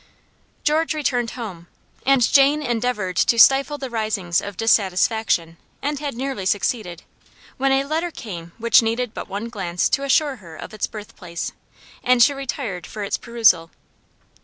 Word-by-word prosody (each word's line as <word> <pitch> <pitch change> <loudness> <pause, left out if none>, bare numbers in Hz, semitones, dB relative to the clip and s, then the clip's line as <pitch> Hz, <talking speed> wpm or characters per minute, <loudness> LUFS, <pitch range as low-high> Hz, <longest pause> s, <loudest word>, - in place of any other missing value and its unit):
George 315 +1 +1
returned 250 -5 0
home, 185 -8 -7 0.4
and 270 -2 +5
Jane 280 +4 +4
endeavored 235 -7 -1
to 235 - +3
stifle 275 +5 +5
the 275 -2 -5
risings 210 -6 0
of 200 -2 -7
dissatisfaction, 195 -5 +1 0.2
and 290 0 -2
had 285 -4 -4
nearly 260 -4 -3
succeeded, 195 -3 -1 0.5
when 270 +1 +1
a 270 0 +3
letter 320 +5 -1
came 175 - -8
which 235 +2 +5
needed 230 +1 -1
but - - -7
one 205 +4 -4
glance 180 -7 -1
to 275 - 0
assure 275 0 +2
her 170 -5 -13
of - - -9
its 215 - -2
birthplace; 185 -5 -7 0.5
and 250 -1 +5
she 285 - +4
retired 260 -9 -5
for 210 - -6
its 200 - -2
perusal. 220 -9 +3
230 Hz, 155 wpm, -22 LUFS, 195-270 Hz, 0.5 s, and